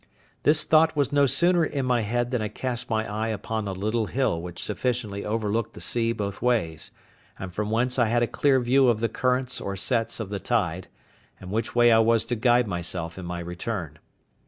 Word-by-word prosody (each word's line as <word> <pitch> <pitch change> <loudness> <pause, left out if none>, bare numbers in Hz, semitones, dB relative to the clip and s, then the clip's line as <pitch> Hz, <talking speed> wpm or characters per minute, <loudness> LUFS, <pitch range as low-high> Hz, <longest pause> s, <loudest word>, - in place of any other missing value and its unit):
This 150 +1 +3
thought 160 0 +4
was 140 -2 +1
no 145 -1 +4
sooner 170 +6 +3
in 140 -4 -2
my 125 -2 +2
head 120 +3 -1
than 125 -3 0
I 110 - -1
cast 120 +3 -3
my 110 -1 0
eye 110 +2 -2
upon 110 0 -3
a - - -2
little 110 +4 -1
hill 130 -11 0
which 90 0 -7
sufficiently 110 -2 -2
overlooked 110 +1 -2
the - - -9
sea 115 -1 0
both 105 -3 -4
ways, 95 -11 0 0.5
and 95 -1 -7
from 105 +2 -2
whence 125 +4 +1
I 120 - +4
had 120 +2 +2
a - - +1
clear 135 +1 +2
view 130 +2 +3
of 115 -3 +2
the 115 0 0
currents 125 +2 -1
or 100 - -4
sets 115 +5 0
of 110 -4 -4
the 100 -1 -3
tide, 95 -6 -1 0.5
and 95 0 -9
which 115 +3 -2
way 120 -1 +6
I 110 - +6
was 115 0 +3
to 120 - -2
guide 120 +1 +3
myself 85 -1 -3
in 90 - -7
my 85 0 -4
return. 85 -3 -5
115 Hz, 210 wpm, -25 LUFS, 100-125 Hz, 0.5 s, way